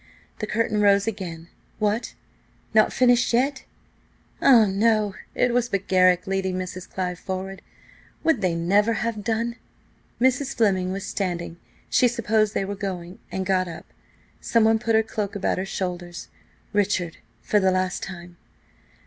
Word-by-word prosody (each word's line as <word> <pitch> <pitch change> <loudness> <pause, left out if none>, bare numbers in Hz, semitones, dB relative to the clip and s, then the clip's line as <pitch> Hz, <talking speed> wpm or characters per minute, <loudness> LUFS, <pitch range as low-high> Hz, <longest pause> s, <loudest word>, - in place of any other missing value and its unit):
The 215 - -3
curtain 215 -1 0
rose 200 -1 +4
again–what! 205 +3 -4 0.6
not 215 0 +5
finished 245 -1 +3
yet? 265 +3 +1 0.8
Ah, 240 -5 +7
no! 210 +1 +2 0.2
it 245 -1 +2
was 240 -1 +1
but 195 -2 -2
Garrick 185 -1 +4
leading 190 -1 -1
Mrs. 185 0 -6
Clive 180 -2 -3
forward. 190 0 -5 0.6
Would 320 -9 +2
they 180 -3 +1
never 200 +7 +2
have 225 -1 -2
done? 230 +2 -1 0.6
Mrs. 260 +2 +1
Fleming 190 -5 +2
was 195 +1 -4
standing; 175 -3 -3 0.3
she 255 - +4
supposed 220 -2 +1
they 195 - 0
were 200 - -4
going, 185 -3 -5
and 190 0 -2
got 185 -1 +1
up. 165 -2 -8 0.5
Someone 225 -1 +3
put 225 0 +1
her 220 - +4
cloak 210 -2 -4
about 195 -2 0
her 190 - -3
shoulders: 175 -2 -5 0.4
Richard–for 205 0 -1
the 190 -1 +3
last 185 0 0
time. 175 -2 -8
200 Hz, 140 wpm, -24 LUFS, 185-225 Hz, 0.8 s, Ah